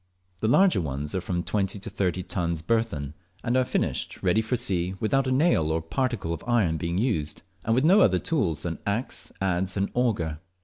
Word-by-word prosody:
The 110 - 0
larger 185 - +4
ones 75 -1 -4
are 95 - -1
from 90 -1 -2
20 100 0 -1
to 100 - -7
30 95 -2 -1
tons 85 -3 -2
burthen, 85 -9 -1 0.3
and 120 0 0
are 130 - +4
finished - - -2
ready 110 - +3
for 115 +3 -1
sea 95 -6 0
without 135 +5 +1
a - - 0
nail 130 - +3
or 80 - +1
particle 95 +1 -2
of 85 - -6
iron 105 -10 +2
being 85 +3 -2
used, 95 - -1 0.2
and 115 - +1
with 130 +4 +2
no 195 +5 +6
other - - +5
tools 85 - -1
than 85 -2 -3
axe, 110 +5 -2
adze, 95 0 0
and 100 +1 0
auger. 100 -11 0
95 Hz, 195 wpm, -26 LUFS, 85-120 Hz, 0.3 s, no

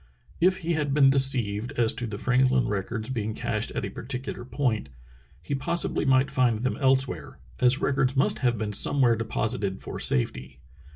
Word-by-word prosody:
If 185 +2 +3
he 170 - 0
had 145 -3 -1
been 135 -2 +5
deceived 125 -3 +2
as 120 -4 +2
to 120 - -3
the 105 -2 -6
Franklin 130 +2 +2
records 110 +3 -3
being 110 -3 -3
cached - - -2
at - - -3
a - - -6
particular 125 -1 -6
point, 120 - -2 0.5
he 90 - -4
possibly 155 +4 0
might 130 0 +2
find 125 -4 +1
them 125 +3 -2
elsewhere, 135 -1 0 0.2
as 125 +2 +3
records 135 -1 0
must 135 - +1
have 120 -3 0
been 105 0 -4
somewhere 125 +2 +3
deposited 110 -2 -3
for - - -7
safety. 65 +1 0
125 Hz, 170 wpm, -25 LUFS, 110-135 Hz, 0.5 s, been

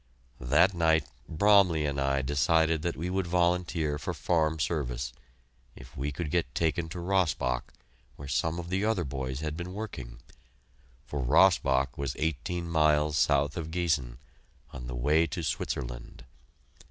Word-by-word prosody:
That 75 +11 +3
night 80 -3 +2 0.2
Bromley 90 -3 +4
and 70 -1 -1
I 70 0 +1
decided 80 +3 +2
that 85 +1 -2
we 85 +4 -3
would 95 -1 -1
volunteer 85 -3 0
for - - -4
farm 80 -2 +1
service, 65 -6 -2 0.6
if - - -13
we 70 +3 -3
could 75 +1 -4
get 80 -7 -1
taken 80 0 0
to 85 - -7
Rossbach, 75 -9 0 0.4
where 70 - -9
some 80 +5 0
of 85 0 -6
the 95 +2 0
other 110 -4 +1
boys 65 -1 -4
had 75 -1 -3
been 90 +2 -6
working, 65 - -7 0.9
for 75 -1 -4
Rossbach 70 -3 +3
was 70 -2 -2
eighteen 80 +3 -2
miles 75 -2 +2
south 75 -3 +2
of 80 -2 -4
Giessen 75 -8 -1 0.6
on 60 -2 -7
the 60 - -5
way 75 +7 +2
to 75 - -5
Switzerland. - - -4
80 Hz, 150 wpm, -29 LUFS, 70-85 Hz, 0.9 s, Bromley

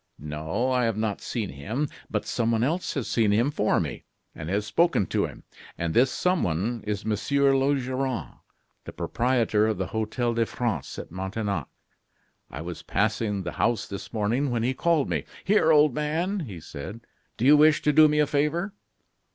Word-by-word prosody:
"No, 80 - -2
I 125 -1 +2
have 115 -2 0
not 110 -2 -2
seen 110 -5 -3
him, 110 - -3 0.2
but - - -2
someone 115 -1 0
else 165 +8 -1
has 135 -5 -2
seen 110 -3 +2
him 115 +7 +2
for 110 -8 +1
me, - - -4 0.3
and 80 0 -7
has 100 +2 0
spoken 110 - +2
to - - 0
him. - - -12 0.3
And 85 -1 -2
this 130 +3 +4
someone 115 - 0
is 105 -2 -2
Monsieur 135 +6 +2
Laugeron, 130 - -1 0.5
the - - -8
proprietor 115 -4 +1
of 110 -3 0
the 95 - -1
Hotel 110 +2 -1
de 115 -1 +1
France 110 - -3
at - - -7
Montaignac. 95 - -3 0.8
I 70 - -7
was 85 0 -6
passing 105 -2 0
the 90 - -4
house 120 - +1
this 100 - -7
morning, 115 +6 0
when 120 -2 -1
he 130 +2 +1
called 160 0 +1
me. - - -1 0.2
'Here, 190 -5 +4
old 150 -3 +5
man,' 165 +8 -1
he 95 -6 -8
said, 80 +9 -8 0.4
'do 120 - -1
you 145 +3 +8
wish 150 0 +5
to 150 - +3
do 155 +1 +8
me 150 0 +1
a 150 - +4
favor? 150 +7 0
115 Hz, 180 wpm, -26 LUFS, 105-145 Hz, 0.8 s, you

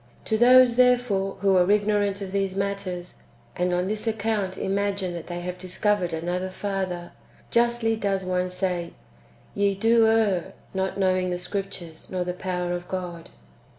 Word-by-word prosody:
To 220 - +1
those, 245 +1 +6
therefore, 245 -6 +3
who 195 -1 +4
are 180 +1 +4
ignorant 205 -1 +2
of 190 -1 -5
these 195 -1 -1
matters, 195 -3 -3 0.4
and 180 0 0
on 180 +1 0
this 215 +2 -2
account 215 -3 -1
imagine 195 -1 -1
that 170 -2 -7
they 175 0 -5
have 180 +1 -5
discovered 185 0 0
another 175 +3 -2
Father, 185 -3 -3 0.4
justly 235 -1 +2
does 195 -3 -1
one 180 0 0
say, 180 -2 -2 0.3
" - - -29
Ye 200 -1 +1
do 225 +2 +4
err, 215 -6 +2 0.2
not 190 0 -2
knowing 185 -1 +2
the 180 - -1
Scriptures, 180 -3 -6
nor 185 -1 -1
the 180 0 -3
power 180 -1 -2
of 175 0 -5
God." 175 -3 -5
190 Hz, 160 wpm, -25 LUFS, 180-205 Hz, 0.4 s, those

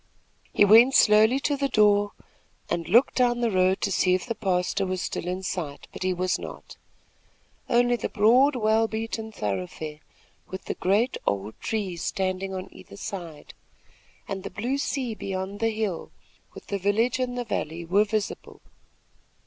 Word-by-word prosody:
He 205 - +5
went 230 +6 +7
slowly 220 +5 +5
to 290 0 0
the 280 0 0
door 205 -3 +3 0.6
and 170 -2 -2
looked 240 +5 +5
down 240 -1 +3
the 235 -2 +1
road 185 0 +2
to - - 0
see 185 0 +3
if 185 - -3
the 235 - -2
pastor 185 -1 0
was 185 -1 -2
still 175 - -4
in 185 +1 -3
sight; 165 -6 -5
but - - -9
he 185 0 +1
was 185 +1 0
not. - - -9 0.9
Only 245 0 +3
the - - -3
broad, 250 +6 +4
well 220 -1 +2
beaten 220 0 -4
thoroughfare, 105 - -4 0.5
with 190 0 -8
the - - -2
great, 210 +7 +1
old 100 +2 -1
trees 190 -6 -3
standing 190 +1 -2
on 185 -1 -5
either - - -13
side, 175 -7 -7 0.7
and 195 -1 -4
the - - -6
blue 250 +6 -2
sea 260 -4 -2
beyond 195 -1 -5
the 225 - +2
hill, 215 -5 -3 0.5
with - - -11
the 200 - -3
village 220 +6 +1
in 250 -1 -2
the 245 -1 -3
valley 170 -5 -3
were 195 +5 +3
visible. 215 -1 -4
205 Hz, 165 wpm, -26 LUFS, 185-230 Hz, 0.9 s, went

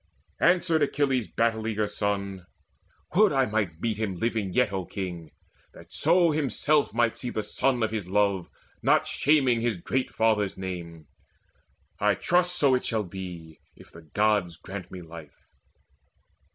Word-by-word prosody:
Answered 170 -2 +3
Achilles' 135 -5 +1
battle 110 -1 0
eager 110 -1 0
son: 100 -3 -3 0.7
"Would 210 +1 +6
I 135 -1 +3
might 105 -7 -2
meet 110 0 -1
him 105 -4 -2
living 110 -1 -1
yet, 95 - +2
O 95 -1 -2
King, 90 -4 -6 0.5
That - - -15
so 170 +1 +3
himself 150 0 +1
might 115 +1 +1
see 125 - -5
the 110 - -3
son 125 0 0
of 110 - 0
his 105 -5 -3
love 100 -2 +1 0.3
Not - - +3
shaming 135 -5 +2
his 115 -4 0
great 125 +9 -2
father's 105 -3 +1
name. 85 -4 -6 0.9
I 105 -1 +3
trust 180 - +1
So 135 -6 +3
shall 115 -3 -1
it 90 - -13
be, 90 -4 -8 0.2
if - - -17
the 85 - -13
Gods 100 +1 0
grant 95 +1 -8
me 90 -1 -8
life." 80 -2 -12
105 Hz, 150 wpm, -27 LUFS, 95-130 Hz, 0.9 s, Would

